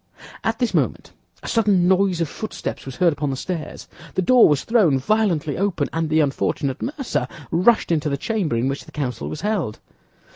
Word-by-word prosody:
At 225 0 0
this 245 -1 0
moment - - -1 0.3
a - - -7
sudden 200 -6 +3
noise 190 -2 +2
of 165 - +1
footsteps 215 -3 -6
was 135 - -6
heard 170 +1 +3
upon 145 0 -2
the 135 - -2
stairs; 165 +2 -5 0.3
the 185 - +1
door 250 +2 +6
was 145 -3 +1
thrown 205 - +3
violently 170 -2 0
open, 190 -7 0
and 165 -1 -1
the 160 +1 +3
unfortunate 140 -1 -1
mercer 265 - -2 0.2
rushed 185 +5 +3
into 155 -2 +1
the 140 - -1
chamber 195 - -1
in 115 +3 0
which 140 +1 -3
the - - -14
council 125 -6 -3
was 150 - -6
held. 205 - -1
170 Hz, 190 wpm, -22 LUFS, 145-210 Hz, 0.3 s, door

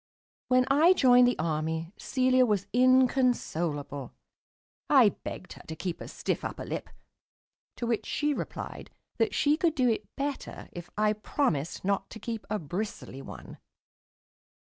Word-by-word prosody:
When 255 0 +4
I 320 +6 +6
joined 250 -6 +6
the 245 - +1
Army, 160 +2 -2
Celia 255 -1 +2
was 205 -5 +1
inconsolable. 245 - +2 0.8
I - - +7
begged - - -8
her - - -13
to 160 - -5
keep 170 +1 -4
a - - -6
stiff - - -3
upper - - -5
lip, - - -5 0.9
to 240 - -4
which 230 -2 -1
she 295 0 0
replied - - -6 0.3
that 440 - +1
she 300 0 +3
could 330 -2 +1
do 255 -4 +3
it 225 - -1
better 280 0 -4
if 175 0 -9
I 210 0 +3
promised 195 - -1
not 195 0 0
to 220 - -9
keep 225 0 -5
a 215 - 0
bristly 165 - -5
one. - - -10
225 Hz, 145 wpm, -29 LUFS, 170-255 Hz, 0.9 s, I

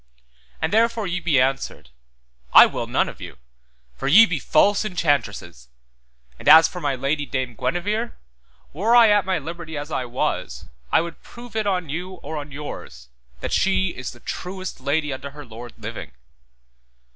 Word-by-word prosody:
And 160 +5 -2
therefore 230 0 +2
ye 180 -1 -2
be 165 -6 +2
answered, 130 - -1 0.6
I - - +11
will - - -4
none - - +1
of - - -9
you, - - -9 0.6
for - - -4
ye 205 +11 +8
be 180 -8 -2
false 205 +9 +3
enchantresses, 140 - -2 0.7
and - - +1
as 160 +1 +9
for 180 - -8
my 140 -3 0
lady, 140 +3 -1
Dame 130 -3 -3
Guenever, 205 - -2 0.6
were 215 +10 +2
I 235 -2 +8
at 205 -2 +3
my 190 -2 +1
liberty 160 +1 -7
as 145 +2 -6
I 130 - -2
was, 120 - -3 0.3
I - - +4
would 170 -1 -8
prove 240 -1 -13
it 215 -2 0
on 180 -5 -1
you 180 +5 -5
or 165 -3 -8
on 145 0 -7
yours, 65 - -9 0.3
that - - -3
she 190 0 +2
is 130 -6 -6
the 120 - -12
truest 185 0 -6
lady 145 +1 0
unto 135 +1 -7
her 145 0 -11
lord 115 +1 -10
living. - - -8
160 Hz, 170 wpm, -22 LUFS, 135-190 Hz, 0.7 s, I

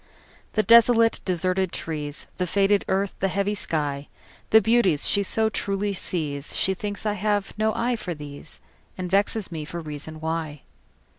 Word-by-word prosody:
The 215 - +2
desolate, 230 +1 +6
deserted 185 0 0
trees, 150 -2 -5
The 180 - -1
faded 200 +2 +3
earth, 195 +1 0
the 195 - +2
heavy 200 +2 0
sky, 145 -7 -2 0.4
The 220 - +8
beauties 205 -8 +3
she 200 - +2
so 220 +3 +2
truly 200 -1 -1
sees, 150 -6 -3
She 190 - +2
thinks 205 +3 -5
I 210 - +1
have 205 0 -1
no 220 +1 +1
eye 245 +1 0
for 180 -5 -5
these, 145 0 -8 0.4
And 180 -1 -4
vexes 200 +1 +1
me 160 -2 -4
for 170 +3 -6
reason 155 0 -6
why. 160 -2 -3
190 Hz, 160 wpm, -25 LUFS, 160-205 Hz, 0.4 s, The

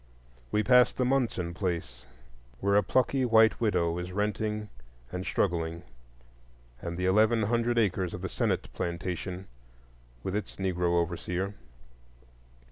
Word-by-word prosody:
We 105 - +2
pass 125 0 +6
the 125 - -1
Munson 120 -10 0
place, 85 -10 -3 0.5
where 100 +1 +2
a 105 - +6
plucky 130 +3 +1
white 110 -2 +4
widow 90 -6 +1
is 90 +1 -5
renting 105 +2 -1 0.4
and 90 - -4
struggling; 85 -4 -1 1.0
and 85 0 -4
the 90 - -1
eleven 110 +4 +4
hundred 120 +2 +1
acres 95 -5 +1
of 90 - -8
the - - -1
Sennet - - -1
plantation, 90 +2 -4 0.8
with 95 - -2
its 105 -2 -4
Negro 90 -2 +1
overseer. 90 +3 -2
95 Hz, 125 wpm, -29 LUFS, 90-110 Hz, 1.0 s, pass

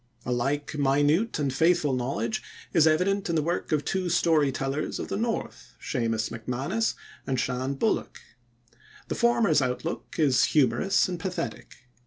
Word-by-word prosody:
A 125 - -2
like 140 +5 -1
minute 145 +9 +2
and 140 -3 -1
faithful 160 -1 +3
knowledge 120 -3 -2 0.3
is 160 -2 +5
evident 185 +5 +1
in 170 - 0
the 155 - +2
work 170 +3 -2
of 150 -2 +1
two 185 -2 -1
story 160 -4 +3
tellers 135 +3 -2
of - - -5
the - - -2
north, 225 +2 -3
Seumas 115 -4 -1
MacManus 130 - -2 0.3
and 130 -2 0
Shan 130 +2 -1
Bullock. - - -1 0.9
The - - 0
former's 230 -10 +3
outlook 130 +6 -3
is 140 -6 +4
humorous 150 - +2
and 180 -2 -4
pathetic. 145 - -5
145 Hz, 150 wpm, -27 LUFS, 130-175 Hz, 0.9 s, is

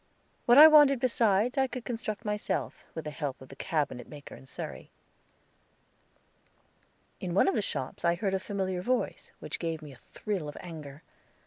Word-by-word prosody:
What 240 +2 +7
I 300 - +12
wanted 295 -4 +7
besides 235 0 +2
I 265 - +3
could 250 -2 -7
construct 225 -2 -4
myself, 210 -2 -3
with 160 - -5
the 150 - -4
help 140 -2 -4
of 130 - -13
the 135 - -11
cabinet 145 -7 -2
maker 145 -1 -10
in 135 - -15
Surrey. - - -7 2.3
In 180 -1 -4
one 200 - +5
of 385 - +3
the - - +1
shops 130 -9 -4
I 170 0 +3
heard 195 +2 -1
a 190 - +1
familiar 190 -2 -2
voice, 250 +6 -2
which - - -6
gave 165 -2 -3
me 150 - -9
a 130 - -14
thrill 190 - -4
of 145 - -9
anger. 155 -4 -9
190 Hz, 180 wpm, -29 LUFS, 150-230 Hz, 2.3 s, I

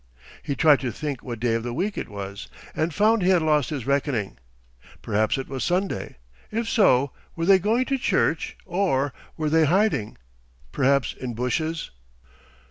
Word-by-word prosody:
He 140 - -3
tried 150 -2 +5
to 130 -3 -3
think 140 +3 -4
what 120 -3 -6
day 120 0 +1
of 115 - 0
the 120 +1 -4
week 200 +5 -1
it - - -5
was, 100 0 -7 0.3
and 160 +2 0
found 215 +5 +3
he 180 - +2
had 180 -4 +4
lost 150 -5 +2
his 135 -6 -4
reckoning. 135 - -1 0.6
Perhaps 110 +4 +1
it 135 - -4
was 130 -3 -4
Sunday. 180 - -1 0.3
If 225 +1 -2
so, 140 - +3 0.2
were 165 - -2
they 195 +1 +6
going 225 +7 +1
to 270 0 -1
church - - 0
or, 170 -8 0 0.2
were 155 -1 -1
they 160 0 +5
hiding, 180 - +1 0.5
perhaps 140 -1 +2
in 125 -3 -6
bushes? 155 +7 -2
145 Hz, 170 wpm, -24 LUFS, 125-185 Hz, 0.6 s, they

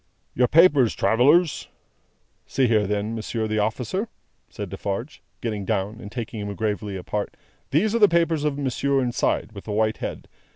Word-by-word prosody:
"Your 125 0 +3
papers, 145 -7 +5
travellers!" 145 +8 +3 0.8
"See 135 - +1
here 110 -3 +2
then, 105 +2 -1
Monsieur 110 0 -3
the 110 0 0
Officer," 125 - -1 0.4
said - - -6
Defarge, 105 +9 -5 0.2
getting 105 -4 -3
down, 105 +2 -2
and 105 - -9
taking 115 -2 -5
him 100 -1 -4
gravely 105 -2 -2
apart, 100 +3 -4 0.3
"these 195 +10 +2
are 235 - +2
the 210 - +8
papers 165 -3 +2
of 150 -2 0
monsieur 140 0 0
inside, 120 -2 0
with 100 -2 -10
the 110 - -5
white 110 +1 +1
head. - - -6
115 Hz, 165 wpm, -24 LUFS, 105-145 Hz, 0.8 s, the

